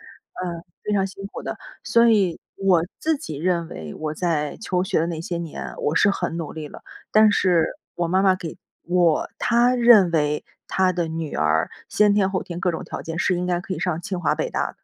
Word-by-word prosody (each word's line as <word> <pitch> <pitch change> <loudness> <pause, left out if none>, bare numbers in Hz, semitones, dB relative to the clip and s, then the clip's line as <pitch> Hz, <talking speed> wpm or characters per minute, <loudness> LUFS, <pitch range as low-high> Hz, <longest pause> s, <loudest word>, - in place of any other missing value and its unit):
呃， 170 -2 -7 0.2
非 210 - -2
常 195 -1 +2
辛 195 +1 -8
苦 - - -8
的。 - - -4 0.3
所 235 0 +4
以 200 -7 +3 0.2
我 185 -4 +3 0.2
自 320 0 +1
己 160 - -7
认 170 +1 0
为 75 -2 -8
我 155 -1 -4
在 155 -4 -1
求 185 -4 0
学 185 - +1
的 165 - +1
那 165 -2 -4
些 170 0 -3
年 165 -3 -6
我 150 - 0
是 200 - +5
很 170 -4 -2
努 165 -3 -4
力 155 -2 -6
了， - - -12 0.3
但 215 -1 +6
是 175 -5 +3 0.3
我 175 -1 -1
妈 185 +2 +3
妈 190 -1 +4
给 165 -3 -7 0.2
我 175 -2 +2
她 240 +2 +3
认 235 -7 +6
为 150 -2 0 0.2
她 185 -1 +2
的 170 -2 -1
女 160 -1 -4
儿 75 +1 +1 0.2
先 210 -1 +4
天 195 -2 +2
后 190 - -1
天 175 0 -7
各 180 - +1
种 165 - -5
条 - - -6
件 165 0 -5
是 185 - +2
应 180 - -2
该 175 -1 +1
可 195 - -5
以 - - -3
上 175 -2 -1
清 190 -4 -4
华 - - +2
北 - - -2
大 - - 0
的。 - - -33
180 Hz, 245 characters per minute, -23 LUFS, 165-195 Hz, 0.3 s, 但